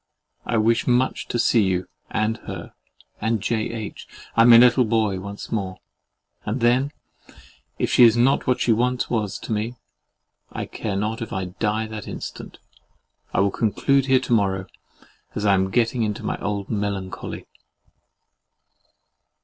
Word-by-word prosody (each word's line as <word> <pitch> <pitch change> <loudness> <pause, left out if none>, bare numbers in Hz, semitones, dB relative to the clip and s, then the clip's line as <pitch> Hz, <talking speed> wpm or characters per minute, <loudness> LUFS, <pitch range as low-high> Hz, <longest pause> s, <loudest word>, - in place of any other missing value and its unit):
I 115 - +1
wish 115 +1 +2
much 125 +1 +1
to - - -2
see 115 0 +3
you 95 -2 0 0.2
and 110 +1 0
her - - -7 0.5
and 110 +1 +1
J. 110 +2 -1
H. 110 -3 -7 0.3
and 115 +1 +6
my 115 - +10
little 125 +1 +6
boy 110 -4 +1
once 100 +2 -8
more; 95 -4 -2 0.7
and 110 +5 -2
then, 125 +4 +2 0.9
if - - -1
she - - +6
is 115 -1 +7
not 130 +4 +3
what 125 - +2
she 120 - +2
once 125 +2 0
was 110 -5 -1
to - - -8
me, 110 +3 -2 0.8
I - - -4
care 105 -3 -4
not 105 +3 -2
if 115 - -5
I 95 -1 -2
die 105 +4 -1
that 110 -2 -7
instant. - - -7 0.7
I - - +2
will 100 0 +2
conclude 130 +6 +1
here 130 -1 +5
till 130 - -8
to - - +3
morrow, 95 -3 +1 0.7
as 105 - -2
I 100 - +5
am 95 0 +2
getting 120 +3 +1
into 105 -2 -2
my - - -2
old 100 -1 -3
melancholy. 100 -3 -4
110 Hz, 160 wpm, -23 LUFS, 100-120 Hz, 0.9 s, my